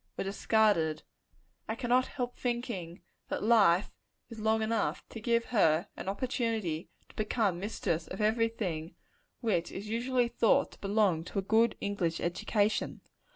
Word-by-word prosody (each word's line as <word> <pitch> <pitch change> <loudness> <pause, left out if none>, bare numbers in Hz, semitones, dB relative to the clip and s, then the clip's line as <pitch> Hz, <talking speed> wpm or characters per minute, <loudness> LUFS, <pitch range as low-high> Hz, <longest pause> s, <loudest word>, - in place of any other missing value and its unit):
were - - -1
discarded 195 -5 +2 0.7
I 220 - -1
cannot 250 +1 +2
help 245 -2 -4
thinking 235 -9 -4 0.3
that - - -2
life 205 -5 +4 0.4
is 230 -2 -9
long 220 +1 +2
enough, 220 -1 -1
to 225 - -8
give 235 +1 +1
her 165 -9 +3
an 190 - -5
opportunity 220 - -2 0.2
to - - -19
become 210 -4 0
mistress 175 -5 -2
of 190 - -7
every 220 +2 +3
thing 175 -7 -4 0.5
which 205 -8 0
is 205 +2 -6
usually 245 +2 +1
thought 270 +4 +2
to - - -16
belong 195 -5 +2
to 200 - -7
a 195 - +1
good 225 +4 +3
English 185 -5 -1
education. 205 +4 0
215 Hz, 150 wpm, -31 LUFS, 185-230 Hz, 0.7 s, life